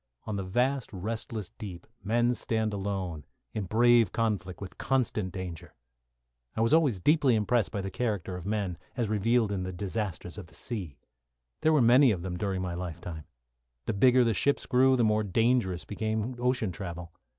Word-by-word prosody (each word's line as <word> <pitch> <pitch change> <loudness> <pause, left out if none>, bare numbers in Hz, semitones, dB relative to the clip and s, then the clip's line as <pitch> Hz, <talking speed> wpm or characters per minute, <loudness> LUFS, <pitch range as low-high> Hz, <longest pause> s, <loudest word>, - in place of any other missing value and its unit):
On 105 - -3
the 100 - -2
vast, 125 +8 0
restless 110 0 -4
deep 95 -6 -7 0.2
men 120 +4 +2
stand 110 -3 -1
alone, 95 -6 -3 0.3
in 105 -3 -2
brave 115 +1 +4
conflict 100 -6 -1
with 100 - -9
constant 110 -7 0
danger. 90 -3 -7 0.8
I 110 - 0
was 115 +5 +3
always 145 - +4
deeply 145 - +4
impressed 110 +1 +1
by 100 - -3
the 95 0 -4
character 100 -7 -2
of 90 - -6
men, 100 -3 -2 0.2
as 120 -3 0
revealed 110 +1 +2
in 100 -2 -1
disasters 100 -1 -4
of 95 - -9
the - - -15
sea. 95 - -4 0.6
There 160 - +4
were 150 -5 +4
many 125 +4 +7
of 90 -6 -1
them 90 -1 -3
during 95 0 -2
my 90 -1 -3
life 85 -1 -5
time. 80 -3 -7 0.6
The - - -1
bigger 125 +5 +5
the 115 -1 +2
ships 140 +8 +1
grew, 130 +1 +4
the 120 - +2
more 110 -1 +3
dangerous 110 -3 +1
became 110 +3 -2
ocean 125 -5 +1
travel. 85 -1 -7
105 Hz, 175 wpm, -29 LUFS, 95-120 Hz, 0.8 s, many